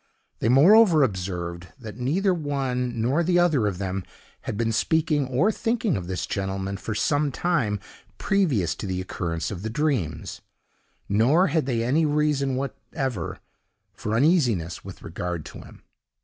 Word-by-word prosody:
They 115 - +1
moreover 165 - +7
observed, 90 -5 -3
that 110 -4 -8
neither 180 +10 +1
one 130 -6 -2
nor 140 +8 +2
the 175 +1 +2
other 160 -11 +3
of 95 -3 -2
them 95 0 -3 0.4
had - - -3
been 115 0 0
speaking 150 +5 +1
or 140 - +2
thinking 225 - 0
of 90 -2 -4
this 90 -2 -3
gentleman 95 0 -3
for 105 +1 -5
some 145 +5 +1
time 125 - 0 0.4
previous 145 - +1
to - - -5
the 95 -1 -2
occurrence 85 -2 -3
of 95 -3 -5
the 110 - -3
dreams; 115 - -2 0.7
nor 135 - +3
had 155 -3 0
they 115 -3 0
any 150 +7 +2
reason 145 -3 +1
whatever 130 - -4 0.6
for 105 +1 -3
uneasiness 120 - +2
with - - -10
regard 90 -3 -4
to - - -10
him. - - -15
125 Hz, 150 wpm, -25 LUFS, 100-155 Hz, 0.7 s, moreover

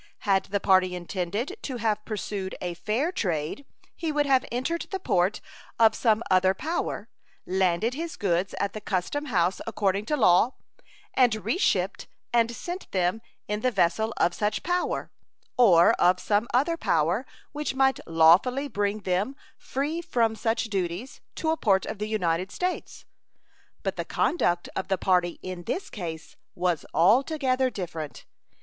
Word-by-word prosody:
Had 195 -2 +2
the 200 0 -1
party 185 -2 +3
intended 190 - -3
to 260 -3 -4
have 215 -2 0
pursued 200 -3 -4
a 180 -1 -3
fair 225 - -1
trade 175 - -2 0.3
he 325 -2 -2
would 295 -1 +1
have 265 -2 +3
entered 260 +8 -2
the 385 - -3
port 195 - +1 0.4
of 225 -1 +6
some 220 -1 +2
other 185 +1 +4
power, 325 - -3 0.4
landed 190 +5 +1
his 325 +4 -5
goods 185 -1 0
at 200 -1 -1
the 215 - -6
custom 205 +10 -2
house 185 - +1
according 205 -2 0
to 300 - +1
law, 220 +2 +4 0.6
and 225 -6 +2
re 225 - +1
shipped - - 0 0.3
and 230 -1 +4
sent 355 +8 -6
them 185 +3 0 0.3
in 210 0 -1
the 255 - +2
vessel 220 +1 +1
of 175 - +2
such 210 +2 -1
power, 355 +3 -1 0.4
or 180 -9 +6
of 180 +1 +4
some 210 +2 +1
other 295 +7 +2
power 170 - +1 0.3
which 295 -2 -3
might 265 0 +3
lawfully 175 - +4
bring 205 -3 -1
them, 195 +8 -1 0.2
free 295 +5 -3
from 235 -10 +1
such 225 +1 0
duties, 195 +2 -4
to 315 - 0
a 320 - 0
port 195 -9 +2
of 200 - -6
the 210 0 -3
United 185 -3 0
States. 365 0 -4 0.8
But - - -2
the - - -3
conduct 175 - +1
of 190 - -3
the 190 - +1
party 180 -2 +1
in 180 -2 -6
this 380 - -3
case 165 -6 -7 0.2
was 175 -3 -1
altogether 260 - +3
different. 165 - -6
210 Hz, 155 wpm, -26 LUFS, 180-260 Hz, 0.8 s, of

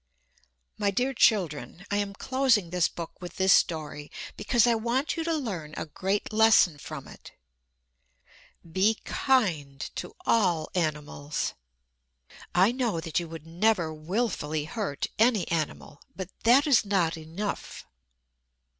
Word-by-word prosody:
My 205 - +2
dear 250 +7 0
children, 180 - +1
I 205 - +1
am 200 -1 -2
closing 245 -8 +1
this 180 -1 +2
book 170 +1 -8
with 180 - -8
this 190 0 +5
story, 150 -2 0 0.3
because 235 +2 +3
I 240 - +4
want 235 +6 0
you 330 - -2
to 330 0 0
learn 185 - -4
a - - -3
great 195 +7 -2
lesson 215 -8 +5
from - - -8
it: - - -13 1.3
be 190 +6 +2
kind 170 - +1 0.2
to - - -6
all 180 -8 +2
animals. 150 -3 -2 1.0
I 185 +5 +5
know 240 -8 -1
that 165 0 -1
you 170 - -5
would 160 -1 -9
never 175 -1 +1
willfully 155 -3 -2
hurt 195 -6 -3
any 220 -5 +3
animal. 155 -2 -3
But 190 -2 -6 0.2
that 255 +6 +6
is 275 -7 +4
not 190 -5 +1
enough. 165 +6 -5
190 Hz, 135 wpm, -27 LUFS, 160-225 Hz, 1.3 s, that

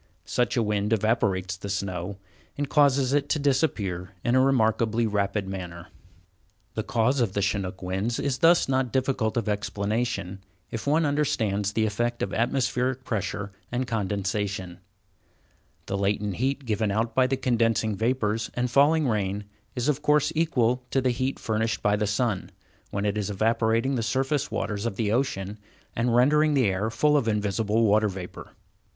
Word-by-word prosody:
Such 125 -1 0
a 115 - +3
wind 105 0 -1
evaporates 100 -4 +1
the 100 +2 -7
snow, 95 -1 -3 0.4
and 145 0 -1
causes 140 -3 +3
it 145 -1 +1
to - - +2
disappear 105 - -1
in 120 - +1
a 130 - +5
remarkably 115 -3 +2
rapid 100 -1 -1
manner. 90 -2 -7 0.8
The 110 - -2
cause 115 +4 +1
of 110 -5 0
Chinook 95 -1 -2
winds 95 +6 -2
is 135 -2 -1
thus 170 +1 +5
not 130 -2 0
difficult 130 -4 0
of 115 - -1
explanation, 105 -1 -2 0.3
if 115 +4 -5
one 155 +3 +3
understands 110 -9 0
the 110 0 +2
effects 120 +3 -1
of 100 - -3
atmospheric 125 +1 0
pressure 100 -3 -3 0.2
and 125 +1 -1
condensation. 100 -4 -2 1.1
The 100 - -3
latent 100 -1 -1
heat 135 +3 -1
given 110 -2 0
out 110 +3 0
by 130 +1 +3
the 135 +1 0
condensing 115 -4 +1
vapors 115 0 0
and 125 0 -1
falling 145 +3 +4
rain 105 -3 -1 0.3
is 125 +1 -1
of 150 -1 +1
course 150 0 +3
equal 125 -7 +1
to 135 - +1
the 130 -1 +2
heat 130 +2 -2
furnished 110 0 -1
by 105 0 +3
the 105 0 0
sun, 105 -2 -1 0.4
when 100 +1 -2
it 105 0 0
was 105 -1 -2
evaporating 115 +4 +1
the 125 - 0
surface 135 +5 0
waters 105 +2 -2
of 110 - -4
the 105 0 0
ocean, 105 -5 -1 0.4
and 120 0 +1
rendering 150 +4 +4
the 130 -3 +3
air 100 +2 0
full 150 +6 +2
of 140 -6 +2
invisible 105 +1 +1
water 105 0 +3
vapor. 95 -2 -8
115 Hz, 165 wpm, -26 LUFS, 100-130 Hz, 1.1 s, a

